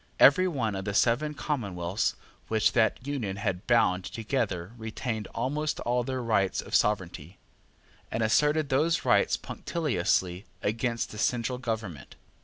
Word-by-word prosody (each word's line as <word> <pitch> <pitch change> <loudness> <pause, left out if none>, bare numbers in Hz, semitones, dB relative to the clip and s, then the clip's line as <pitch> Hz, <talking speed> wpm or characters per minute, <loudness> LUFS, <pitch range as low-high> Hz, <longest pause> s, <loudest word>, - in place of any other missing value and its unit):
Every 185 0 +7
one 120 - -1
of 95 0 -4
the 100 -1 -2
seven 150 +8 +2
commonwealths 100 - -2 0.3
which 110 -1 +2
that 115 +1 +1
Union 125 -9 -3
had 95 -2 -3
bound 105 -6 +3
together 110 -4 -2
retained 110 -1 -4
almost 150 +6 -1
all 120 +1 0
the 130 +2 -3
rights 110 -6 +1
of - - -7
sovereignty, 90 -4 0 0.7
and 115 - -1
asserted 150 +7 +2
those 155 +4 +2
rights - - +3
punctiliously 95 - -1 0.2
against 115 +2 -1
the 105 - -8
central 125 +2 0
government. 110 - -5
115 Hz, 135 wpm, -28 LUFS, 100-130 Hz, 0.7 s, Every